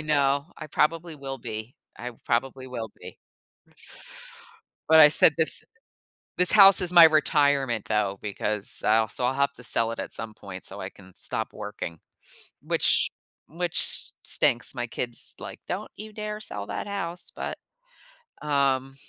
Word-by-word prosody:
know, 145 -2 +1
I 155 - -8
probably 165 +2 0
will 135 -1 -6
be, 110 0 -7 0.2
I 125 +2 -5
probably 130 +2 -1
will 115 -4 -6
be. - - -11 1.7
But 160 0 +8
I 150 - +10
said 150 +1 +4
this 160 - 0 0.7
this 180 0 +3
house 195 -2 +8
is 180 -1 -1
my 175 -2 +10
retirement, 145 -7 +3
though, 100 -2 0
because 105 0 -3
I'll 110 +1 +3
so 125 - -5
I'll 130 - 0
have 140 +1 +1
to 125 - -12
sell 115 -1 0
it - - -8
at - - -3
some 110 -1 -4
point 95 -3 -10
so 100 +1 -6
I 95 - -5
can 95 -2 -16
stop - - -2
working, 85 -1 -6 0.6
which - - +2 0.4
which 170 +2 0
stinks. 120 +2 +1
My 120 -1 -3
kid's 120 0 -2
like, - - -9
"Don't - - -4
you 215 +1 -9
dare 210 0 -5
sell 105 - -6
that 100 - -5
house," 180 -4 -5
but, - - -5 0.8
um, 135 -2 +1
135 Hz, 155 wpm, -26 LUFS, 110-160 Hz, 1.7 s, I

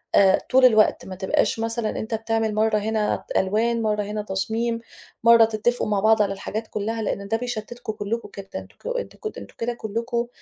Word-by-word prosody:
آآ، 190 -1 +6
طول 260 0 +6
الوقت 220 -4 +4
ما 190 - -7
تبقاش 190 +4 +1
مثلًا 225 0 -1
أنت 220 +1 -5
بتعمل 225 -1 -1
مرّة 220 0 +3
هنا 215 0 0
ألوان، 225 +4 +1
مرّة 210 -1 0
هنا 210 +1 -3
تصميم، 220 +4 -1 0.4
مرّة 230 -1 +8
تتّفقوا 225 +2 0
مع 205 -2 +1
بعض 220 +1 +4
على 200 -1 +1
الحاجات 220 +3 -5
كلّها، 220 +2 -3
لأن 200 -1 -3
ده 225 +2 +1
بيشتّتكوا 240 -1 -5
كلّكوا 220 +2 -4
جدًا 195 -1 -6
أنتك - - -13
أنتم - - -8
ك 430 - -6
أنتم - - -10
كده 240 +1 -2
كلّكوا 235 +2 -2
220 Hz, 185 wpm, -24 LUFS, 210-230 Hz, 0.4 s, مرّة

